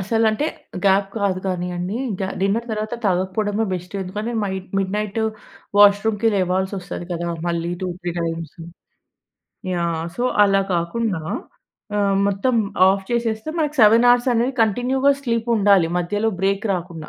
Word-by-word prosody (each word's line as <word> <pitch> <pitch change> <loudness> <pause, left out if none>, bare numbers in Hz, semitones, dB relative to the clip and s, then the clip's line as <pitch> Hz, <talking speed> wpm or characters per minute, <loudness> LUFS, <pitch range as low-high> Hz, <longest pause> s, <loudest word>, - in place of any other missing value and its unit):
అసలంటే 225 +7 +1 0.4
gap 195 0 +3
కాదు 195 -2 0
గాని 180 -1 -2
అండి. 180 +5 -3 0.2
గ్యా 190 - -1
డిన్నర్ 205 +5 0
తరువాత 215 +2 -3
తాగకపోవడమే 200 +3 0
బెస్టు. 180 +2 -5
ఎందుకంటే 210 +5 -4
మైడ్ 190 -1 -4
మిడ్ 195 0 -1
నైట్ 210 +1 -2 0.6
వాష్రూమ్‌కి 205 +2 +5
లేవాల్సి 190 +1 0
వస్తది 175 -1 -7
కదా! 170 0 -3 0.2
మళ్ళి 170 0 -1
two, 185 - -1
three 175 0 -3
times. 165 0 -4 1.2
Yeah, 170 -2 -1
so 245 - -2 0.2
అలా 195 -1 +3
కాకుండా 180 +2 -1 0.8
ఆహ్, 200 -1 +2
మొత్తం 200 +6 0 0.3
ఆఫ్ 195 0 +1
చేసేస్తే 230 +2 -1
మనకి 300 -1 -1
7 240 +3 +5
అనేది 240 +3 +1
కంటిన్యూ‌గా 255 +6 +2
స్లీప్ 230 -2 -1
ఉండాలి. 200 -5 +4
మధ్యలో 205 +5 0
బ్రేక్ 195 +2 0
రాకుండా. 170 -3 -6
200 Hz, 135 wpm, -21 LUFS, 185-225 Hz, 1.2 s, వాష్రూమ్‌కి